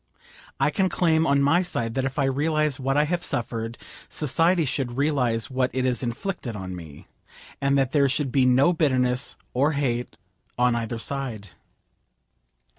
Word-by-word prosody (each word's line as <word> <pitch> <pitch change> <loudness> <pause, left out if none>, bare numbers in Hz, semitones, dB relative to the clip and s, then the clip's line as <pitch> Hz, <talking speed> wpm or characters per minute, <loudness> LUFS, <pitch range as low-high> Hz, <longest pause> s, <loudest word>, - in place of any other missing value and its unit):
I 140 +2 +2
can 190 +5 +1
claim 160 -3 +2
on 140 0 +3
my 160 +6 +4
side 115 -10 -2
that 130 +1 -1
if 135 +1 -4
I 145 - +2
realise 150 +1 0
what 135 +1 0
I 150 - +5
have 170 +3 -1
suffered, 115 0 -3 0.3
society 165 +3 +2
should 130 -2 -2
realise 130 -5 0
what 130 0 +1
it 130 0 0
has 125 -2 0
inflicted 125 - -4
on 95 -2 -6
me; 80 -5 -11 0.6
and 140 0 +2
that 135 -2 +1
there 140 -2 +3
should 135 0 -1
be 135 0 +3
no 130 +7 +4
bitterness 130 -5 +1 0.2
or 140 +5 +2
hate 125 - -2 0.4
on 125 0 +3
either 115 0 -2
side. 115 -5 -4
135 Hz, 165 wpm, -25 LUFS, 120-150 Hz, 0.6 s, I